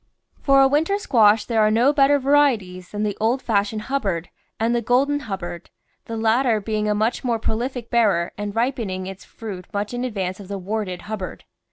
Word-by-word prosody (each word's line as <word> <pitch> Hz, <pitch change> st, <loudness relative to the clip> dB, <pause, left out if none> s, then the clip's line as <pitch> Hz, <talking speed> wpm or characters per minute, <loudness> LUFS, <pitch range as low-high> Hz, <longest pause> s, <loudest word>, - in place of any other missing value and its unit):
For 275 Hz, -1 st, +5 dB
a -, -, +6 dB
winter 315 Hz, +8 st, +1 dB
squash 220 Hz, -, +4 dB
there 225 Hz, -2 st, +1 dB
are 215 Hz, -, +4 dB
no 240 Hz, +6 st, +3 dB
better 285 Hz, 0 st, +4 dB
varieties 255 Hz, -11 st, +1 dB
than 210 Hz, 0 st, -3 dB
the 210 Hz, -1 st, -1 dB
old 235 Hz, +4 st, +2 dB
fashioned 215 Hz, 0 st, 0 dB
Hubbard 200 Hz, -10 st, -2 dB, 0.3 s
and 225 Hz, +2 st, +1 dB
the 240 Hz, -, +1 dB
Golden 270 Hz, +5 st, +2 dB
Hubbard, 185 Hz, -, -6 dB, 0.4 s
the 230 Hz, -, -5 dB
latter 225 Hz, +1 st, +2 dB
being 210 Hz, 0 st, -2 dB
a 210 Hz, -, +2 dB
much 220 Hz, +3 st, 0 dB
more 240 Hz, -3 st, +1 dB
prolific 235 Hz, +2 st, -3 dB
bearer 200 Hz, -8 st, +2 dB
and 205 Hz, 0 st, -5 dB
ripening 225 Hz, -6 st, -1 dB
its 190 Hz, 0 st, -8 dB
fruit 195 Hz, -5 st, -8 dB
much 205 Hz, +2 st, -3 dB
in 245 Hz, +1 st, -3 dB
advance 195 Hz, -6 st, -3 dB
of 200 Hz, -, -10 dB
the 200 Hz, 0 st, -4 dB
warted 195 Hz, -1 st, -4 dB
Hubbard. 210 Hz, -4 st, -6 dB
220 Hz, 190 wpm, -22 LUFS, 200-250 Hz, 0.4 s, a